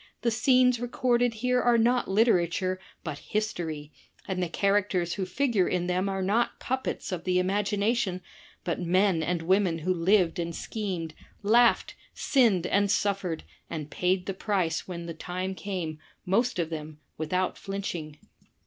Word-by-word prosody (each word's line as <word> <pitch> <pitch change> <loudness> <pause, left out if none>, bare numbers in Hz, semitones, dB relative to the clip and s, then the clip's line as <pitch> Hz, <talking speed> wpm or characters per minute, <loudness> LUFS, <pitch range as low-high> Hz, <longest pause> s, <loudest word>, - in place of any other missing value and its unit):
The 235 - +2
scenes 250 +1 +4
recorded 245 -1 +1
here 250 +2 +1
are 240 -1 +4
not 240 +2 +2
literature 185 -3 +2 0.2
but 150 -4 -5
history, 165 -8 -3 0.4
and 185 -1 -2
the 175 - -1
characters 195 -2 +1
who 190 -2 -3
figure 225 -2 +1
in 180 -1 0
them 180 +2 0
are 195 -1 -2
not 220 +5 +1
puppets 260 -4 -3
of 180 -3 -3
the 180 -1 +1
imagination, 200 +1 0 0.4
but 175 0 -2
men 185 0 +2
and 170 +1 -1
women 185 -1 +2
who 180 +3 0
lived 180 0 +2
and 170 -1 -3
schemed, 185 -7 -4 0.3
laughed, 235 +4 +4 0.2
sinned 225 - +3
and 200 +2 +2
suffered, 195 -5 0 0.3
and 150 -2 -5
paid 180 0 0
the 195 - -2
price 185 -4 -1
when 170 -2 -6
the 170 - -5
time 185 +3 -4
came, 180 -6 -4 0.3
most 225 +6 +1
of 165 -2 -1
them, 155 -1 -6 0.2
without 180 +4 0
flinching. 175 -6 -5
185 Hz, 150 wpm, -28 LUFS, 170-215 Hz, 0.4 s, scenes